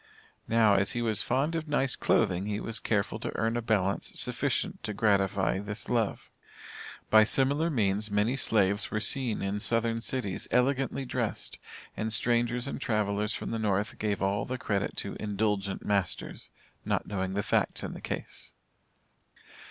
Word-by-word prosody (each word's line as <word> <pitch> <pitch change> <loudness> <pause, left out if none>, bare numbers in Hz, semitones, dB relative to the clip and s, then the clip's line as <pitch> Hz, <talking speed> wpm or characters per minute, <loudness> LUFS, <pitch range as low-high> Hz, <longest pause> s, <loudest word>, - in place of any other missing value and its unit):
Now, 115 -2 +4
as 100 0 +2
he 120 - -1
was 110 -3 +1
fond 135 +6 0
of 165 -1 -3
nice 135 -3 +2
clothing, 95 +1 +1
he 105 0 -2
was 115 0 0
careful 105 0 -1
to - - -3
earn 115 +1 0
a 120 - 0
balance 100 -4 0
sufficient - - -1
to 105 -1 -4
gratify 100 -2 +2
this 105 +1 -6
love. 115 -4 -1 0.8
By 110 0 +8
similar 140 +8 +3
means, 105 -6 +1
many 105 +5 +1
slaves 100 -5 +2
were 105 - -1
seen 115 +1 0
in 100 +1 -1
southern 115 +1 0
cities 115 -6 -2
elegantly 135 +1 +1
dressed, 120 -4 -3 0.4
and, 110 +1 -2
strangers 120 +3 +1
and - - -5
travelers 105 -1 0
from - - -5
the 115 - -2
North 105 -1 -1
gave 105 -2 -1
all 100 +1 +1
the 130 - -3
credit 100 -4 -2
to - - -5
"indulgent 105 -2 -1
masters," 100 -3 -1 0.3
not - - -1
knowing 95 -1 -3
the 100 - 0
facts - - 0
in - - -4
the - - -9
case. - - -6
110 Hz, 160 wpm, -29 LUFS, 100-120 Hz, 0.8 s, By